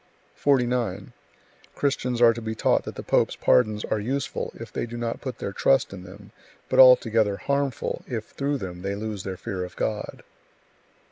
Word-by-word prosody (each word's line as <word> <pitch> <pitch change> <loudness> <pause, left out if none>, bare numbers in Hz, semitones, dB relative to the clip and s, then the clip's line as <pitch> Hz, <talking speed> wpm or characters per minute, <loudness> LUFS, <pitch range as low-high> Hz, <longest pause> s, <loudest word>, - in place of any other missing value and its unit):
49. 125 -7 0 0.6
Christians 125 -4 0
are 115 -1 +7
to 115 - -7
be 110 0 -4
taught - - +2
that - - -6
the - - -7
pope's - - +2
pardons 110 -4 +2
are 110 - -1
useful, 135 +7 -3
if - - -10
they - - -2
do 120 +1 -7
not 115 -1 -3
put 130 -3 -5
their 100 - -5
trust 135 +2 +2
in 95 - -8
them; 100 +3 -13 0.4
but - - +2
altogether 115 -5 +6
harmful, 140 +5 -2
if 110 -3 -5
through 140 +1 -1
them 90 -6 -7
they 100 +1 -3
lose 105 -1 -4
their 95 -1 -5
fear 95 0 -4
of 90 - -8
God. - - -3
115 Hz, 180 wpm, -25 LUFS, 100-125 Hz, 0.6 s, are